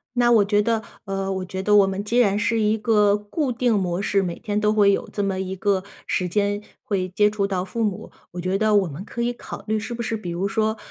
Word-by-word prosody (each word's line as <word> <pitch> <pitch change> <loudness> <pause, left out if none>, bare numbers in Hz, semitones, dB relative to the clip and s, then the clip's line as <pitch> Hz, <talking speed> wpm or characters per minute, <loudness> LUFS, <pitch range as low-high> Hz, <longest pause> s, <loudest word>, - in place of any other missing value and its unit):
那 240 0 +4
我 215 -3 +5
觉 205 +1 +3
得 225 +1 0 0.2
呃， 195 -1 -2
我 190 -1 -3
觉 190 +1 -5
得 210 +1 +4
我 200 -2 +6
们 195 +1 -3
既 235 +4 +1
然 205 -4 +3
是 225 +1 +1
一 215 +1 +2
个 210 -2 +3
固 230 +7 -2
定 245 0 +1
模 180 -4 0
式， 200 -1 +1
每 175 -3 -3
天 210 -2 -2
都 210 0 +3
会 205 -2 +5
有 - - -1
这 205 - -2
么 195 -1 -1
一 190 0 -3
个 190 -1 0 0.2
时 180 - -1
间 205 +2 0 0.2
会 185 -3 -1
接 210 +3 +3
触 200 -2 0
到 185 -2 -2
父 230 +4 -3
母， 205 -3 -3 0.2
我 180 - -7
觉 185 +2 0
得 215 0 +2
我 195 -3 +3
们 155 +6 -7
可 235 - -6
以 240 +1 0
考 - - -9
虑 215 0 +1
是 225 +3 -5
不 235 - -4
是 225 - -2
比 195 -5 -6
如 175 +3 -1
说， 220 +2 0
205 Hz, 280 characters per minute, -23 LUFS, 190-220 Hz, 0.2 s, 我